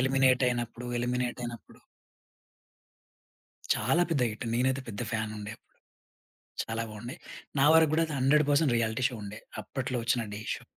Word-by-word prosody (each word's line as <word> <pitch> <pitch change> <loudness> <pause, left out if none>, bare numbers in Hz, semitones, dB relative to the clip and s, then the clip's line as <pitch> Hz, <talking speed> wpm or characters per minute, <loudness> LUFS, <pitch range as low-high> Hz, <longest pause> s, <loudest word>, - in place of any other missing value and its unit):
Eliminate 130 0 +4
అయినప్పుడు 120 0 -3
eliminate 125 0 -1
అయినప్పుడు 120 -1 -8 1.9
చాలా 135 +10 +2
పెద్ద 140 -6 +2
హిట్ 110 +3 -6
నేనైతే 130 +2 +1
పెద్ద 100 -1 -5
ఫ్యానుండే 110 -1 -3
అప్పుడు. - - -42 1.0
చాలా 115 0 -3
బావుండే. 115 +4 -7 0.4
నా - - +6
వరకు 160 -2 +6
కూడా 165 +1 +3
అది 155 - -5
100% 145 0 +4
రియాలిటీ 115 +2 0
షో 120 - -6
ఉండే 105 +1 -7 0.2
అప్పట్లో 130 +1 -3
వచ్చిన 120 0 +2
'ఢీ' 105 +1 -5
షో. - - -9
125 Hz, 140 wpm, -29 LUFS, 115-135 Hz, 1.9 s, నా